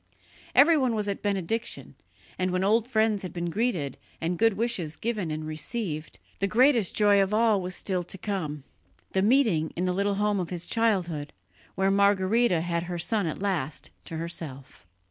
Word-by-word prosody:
Everyone 280 Hz, -6 st, +5 dB
was 210 Hz, -1 st, -2 dB
at 200 Hz, -, -3 dB
Benediction, 205 Hz, +2 st, -3 dB, 0.5 s
and 185 Hz, 0 st, +1 dB
when 185 Hz, +1 st, 0 dB
old 220 Hz, +3 st, +3 dB
friends 220 Hz, -4 st, +1 dB
had 185 Hz, -, -6 dB
been 170 Hz, -1 st, -3 dB
greeted 185 Hz, -, -1 dB, 0.2 s
and 170 Hz, +1 st, -2 dB
good 225 Hz, -1 st, +4 dB
wishes 195 Hz, -8 st, -1 dB
given 210 Hz, -6 st, -2 dB
and 155 Hz, 0 st, -4 dB
received, 155 Hz, 0 st, -4 dB, 0.2 s
the 195 Hz, -, +1 dB
greatest 235 Hz, -1 st, +3 dB
joy 205 Hz, -2 st, +5 dB
of 195 Hz, +2 st, +1 dB
all 220 Hz, -3 st, +3 dB
was 180 Hz, 0 st, -3 dB
still 185 Hz, -2 st, -1 dB
to 195 Hz, -, -8 dB
come 160 Hz, -8 st, -4 dB, 0.5 s
the 190 Hz, -, +1 dB
meeting 210 Hz, -, +3 dB
in 180 Hz, -, -1 dB
the 180 Hz, -, 0 dB
little 200 Hz, +2 st, 0 dB
home 205 Hz, 0 st, +1 dB
of 175 Hz, -, -3 dB
his 175 Hz, -1 st, -4 dB
childhood, 180 Hz, -10 st, 0 dB, 0.4 s
where 195 Hz, 0 st, +2 dB
Margherita 200 Hz, 0 st, +3 dB
had 170 Hz, 0 st, -1 dB
her 175 Hz, -, -3 dB
son 205 Hz, +2 st, 0 dB
at 160 Hz, +5 st, -4 dB
last 160 Hz, -8 st, -2 dB
to 165 Hz, -, -6 dB
herself. 140 Hz, -, -5 dB
195 Hz, 175 wpm, -27 LUFS, 170-220 Hz, 0.5 s, Everyone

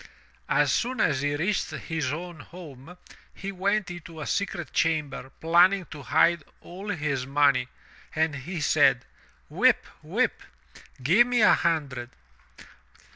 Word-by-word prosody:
As -, -, +3 dB
soon 250 Hz, 0 st, -1 dB
as 140 Hz, -8 st, +2 dB
he 145 Hz, 0 st, 0 dB
reached 180 Hz, +7 st, -1 dB
his 160 Hz, -5 st, -3 dB
own 170 Hz, +1 st, -6 dB
home 160 Hz, 0 st, -12 dB, 0.4 s
he 195 Hz, 0 st, -6 dB
went 195 Hz, +1 st, -1 dB
into 165 Hz, -2 st, -10 dB
a 150 Hz, -, -5 dB
secret 175 Hz, -7 st, -3 dB
chamber 150 Hz, -5 st, -1 dB
planning 180 Hz, +3 st, +4 dB
to 150 Hz, -, -8 dB
hide 170 Hz, +4 st, +2 dB, 0.2 s
all 190 Hz, +4 st, -9 dB
his 145 Hz, -7 st, -2 dB
money, 135 Hz, -3 st, +3 dB, 0.5 s
and 160 Hz, -1 st, +1 dB
he 160 Hz, +5 st, -6 dB
said, 135 Hz, -4 st, +3 dB, 0.4 s
"Whip, -, -, +3 dB, 0.2 s
whip, -, -, -1 dB, 0.6 s
give 200 Hz, -, +5 dB
me 245 Hz, -2 st, +1 dB
a 210 Hz, -, +7 dB
hundred!" 140 Hz, -7 st, -1 dB
160 Hz, 130 wpm, -26 LUFS, 145-180 Hz, 0.6 s, a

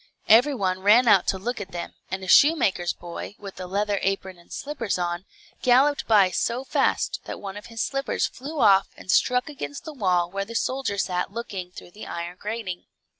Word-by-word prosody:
Every 250 Hz, +6 st, +6 dB
one 185 Hz, -4 st, -1 dB
ran 215 Hz, +6 st, +5 dB
out 200 Hz, -4 st, +5 dB
to 190 Hz, -, +1 dB
look 235 Hz, +4 st, -4 dB
at 190 Hz, -2 st, -8 dB
them, 175 Hz, -, -5 dB, 0.2 s
and 190 Hz, 0 st, -4 dB
a -, -, -7 dB
shoemaker's 195 Hz, -, +4 dB
boy, 175 Hz, +4 st, -8 dB
with 195 Hz, -2 st, -10 dB
a 185 Hz, -, -5 dB
leather 205 Hz, +1 st, 0 dB
apron 190 Hz, -2 st, -2 dB
and 170 Hz, -, -21 dB
slippers 275 Hz, -9 st, -3 dB
on, 175 Hz, +1 st, -3 dB, 0.4 s
galloped 270 Hz, +3 st, +3 dB
by 200 Hz, -4 st, +5 dB
so 240 Hz, +6 st, -1 dB
fast, -, -, 0 dB
that -, -, -6 dB
one 195 Hz, -1 st, -7 dB
of 205 Hz, -, -9 dB
his 230 Hz, 0 st, -3 dB
slippers 275 Hz, 0 st, -1 dB
flew 290 Hz, +4 st, -6 dB
off 195 Hz, -2 st, +5 dB
and 185 Hz, -, -4 dB
struck 250 Hz, +4 st, +3 dB
against 285 Hz, -1 st, -6 dB
the 315 Hz, -, -7 dB
wall 180 Hz, -8 st, +1 dB
where 195 Hz, +1 st, -2 dB
the 230 Hz, +3 st, -9 dB
soldier 260 Hz, -4 st, -1 dB
sat 180 Hz, 0 st, -1 dB
looking 200 Hz, -5 st, -5 dB
through 180 Hz, -, -12 dB
the 210 Hz, -, -10 dB
iron 170 Hz, +1 st, -5 dB
grating. 210 Hz, -4 st, -5 dB
200 Hz, 200 wpm, -25 LUFS, 185-245 Hz, 0.4 s, Every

